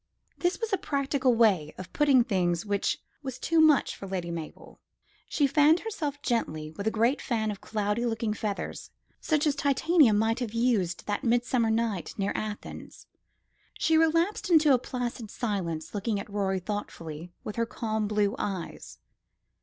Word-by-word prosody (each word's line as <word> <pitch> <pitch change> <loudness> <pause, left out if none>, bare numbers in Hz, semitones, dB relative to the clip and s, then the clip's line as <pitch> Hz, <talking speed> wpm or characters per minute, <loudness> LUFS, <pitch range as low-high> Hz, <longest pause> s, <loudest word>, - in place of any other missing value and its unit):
This 350 +1 0
was 455 -2 -3
a 390 - +2
practical 275 -3 +1
way 195 -10 +3
of 185 - -9
putting 280 -4 +5
things 180 -6 0
which 205 -1 0 0.2
was 265 -3 -5
too 330 +4 +2
much 310 -3 +4
for 195 - -8
Lady 180 -3 -3
Mabel. 165 -2 -8 0.5
She 290 - +2
fanned 295 +4 +4
herself 310 -11 -4
gently 155 -11 -1
with 200 +7 -5
a 220 0 -1
great 235 +5 +2
fan 220 -3 -1
of 200 - -8
cloudy 210 +1 -1
looking 225 -1 -1
feathers, 210 -2 -4 0.3
such 305 -2 +1
as 295 - +3
Titania 285 0 +4
might 220 +3 +2
have 230 -3 -4
used 220 -8 +1
that 205 -1 -2
midsummer 240 0 +2
night 220 -5 -1
near 200 -1 0
Athens. 215 -1 -6 0.7
She 320 - +2
relapsed 330 +5 +2
into 310 -4 +6
a 250 - +4
placid 245 -3 -4
silence, 170 -10 -3
looking 205 0 -1
at - - -7
Rorie 195 -2 -1
thoughtfully 175 -5 -6
with 210 - -6
her 230 0 +1
calm 220 -3 -2
blue 210 -1 +1
eyes. 190 -4 -5
225 Hz, 160 wpm, -28 LUFS, 200-275 Hz, 0.7 s, into